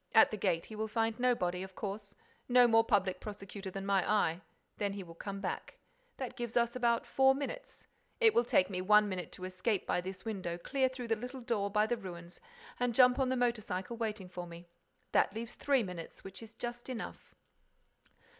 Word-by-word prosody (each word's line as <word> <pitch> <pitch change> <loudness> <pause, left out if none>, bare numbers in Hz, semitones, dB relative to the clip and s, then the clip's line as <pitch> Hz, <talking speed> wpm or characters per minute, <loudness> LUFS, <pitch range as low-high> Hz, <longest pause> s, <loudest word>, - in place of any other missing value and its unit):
At 220 - +8
the - - -1
gate, 170 -3 0
he 220 - -9
will 220 +1 -2
find 225 +1 0
nobody, 185 -8 +1
of 190 0 -8
course: 200 0 -5 0.3
no 245 0 +7
more 225 -1 +5
public 190 -4 +1
prosecutor 200 -1 -7
than 195 +1 -5
my 195 -2 +2
eye. 180 -5 +2 0.4
Then 200 -1 0
he 200 -1 -5
will 170 -2 -11
come 200 +3 -6
back. - - -4 0.4
That 255 -2 -5
gives 240 -1 -3
us 235 0 +2
about 235 -2 +2
four 265 0 +4
minutes. - - -6 0.3
It 450 -3 +6
will 235 - +4
take 185 -6 +3
me 185 -1 -3
one 210 +2 +6
minute 185 -3 -4
to 185 - -6
escape 185 +2 -1
by - - +1
this 185 +3 -7
window, 185 -6 -3
clear 260 +8 +1
through 250 -2 -7
the 225 - +3
little 250 +4 -7
door 210 -4 0
by 210 +1 +3
the 240 +2 0
ruins 175 -3 -9 0.4
and 245 -2 0
jump 250 +1 +6
on 260 -1 +2
the 260 - +1
motor 240 -2 +1
cycle 190 +3 -4
waiting 215 -4 -3
for 180 -1 -7
me. 170 +1 -10 0.5
That 195 - +3
leaves 230 +1 -5
three 275 -4 +2
minutes, 180 -4 -7
which 195 +2 -9
is 225 0 -12
just 240 +1 -6
enough." 245 -3 -7
215 Hz, 205 wpm, -33 LUFS, 190-240 Hz, 0.5 s, At